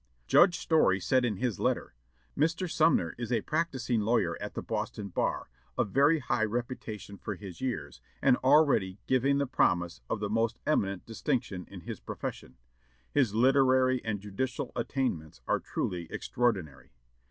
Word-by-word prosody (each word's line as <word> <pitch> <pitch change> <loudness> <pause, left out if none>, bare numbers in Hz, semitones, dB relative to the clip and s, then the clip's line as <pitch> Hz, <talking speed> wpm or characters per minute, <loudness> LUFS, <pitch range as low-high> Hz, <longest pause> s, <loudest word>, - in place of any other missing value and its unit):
Judge 175 - +5
Story 155 - +3
said 130 +7 +2
in 115 -4 0
his 120 -2 -2
letter, - - -1 0.4
"Mr. 165 +4 +1
Sumner 155 - +2
is 120 0 -4
a 115 -3 +2
practising 135 -7 -1
lawyer 105 -6 +1
at - - -6
the - - -4
Boston 100 -1 -4
bar, - - -1 0.3
of 100 - 0
very 145 +6 +4
high 125 -5 0
reputation 110 -3 -5
for 105 - -4
his 95 +1 -10
years, 85 - -4 0.2
and 130 -2 +5
already 130 -9 +3
giving 135 +2 +2
the 140 - +1
promise 85 - +1
of - - -1
the 105 - -1
most 115 +2 0
eminent 100 - 0
distinction 115 - -2
in - - -9
his - - -7
profession; - - -7 0.5
his 125 -8 +2
literary 130 0 +4
and 105 -3 -2
judicial 125 +6 -3
attainments 120 - -2
are - - +2
truly 85 -2 -3
extraordinary. 100 - -1
120 Hz, 155 wpm, -30 LUFS, 100-135 Hz, 0.5 s, Judge